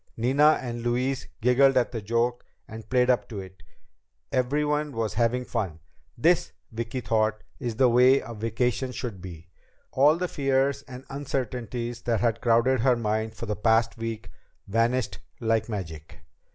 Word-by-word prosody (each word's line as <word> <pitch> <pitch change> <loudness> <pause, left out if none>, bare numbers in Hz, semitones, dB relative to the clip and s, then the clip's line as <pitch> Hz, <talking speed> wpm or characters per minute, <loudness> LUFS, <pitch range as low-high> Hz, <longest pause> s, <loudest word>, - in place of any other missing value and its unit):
Nina 140 +6 +4
and 120 -2 -5
Louise 125 +3 -1
giggled 130 +3 +4
at 125 - +2
the 115 -3 -4
joke 115 +3 0 0.2
and 110 0 -10
played 125 0 +4
up 125 - -1
to 105 -4 -5
it. 95 -1 -11 0.7
Everyone 150 +3 0
was 115 -3 -2
having 120 +2 +1
fun. 100 -11 -3 0.4
This, 170 +8 +2 0.2
Vicki 115 +3 -4
thought, 110 0 0 0.2
is 120 -4 -3
the 130 +3 +4
way 125 +3 +5
a 115 - -8
vacation 115 +4 -1
should 110 -9 -5
be! 85 -2 -10 0.4
All 145 +4 +4
the 180 +1 -1
fears 135 -2 +1
and 130 0 -10
uncertainties 125 -4 -4
that 115 -3 0
had 115 -1 0
crowded 120 +2 +3
her 125 +2 +4
mind 110 -1 -2
for 115 - -6
the 105 -1 -2
past 115 +2 +2
week 115 -1 -5 0.4
vanished 115 +4 0 0.2
like 115 -1 0
magic. 80 -8 -6
120 Hz, 155 wpm, -26 LUFS, 110-130 Hz, 0.7 s, way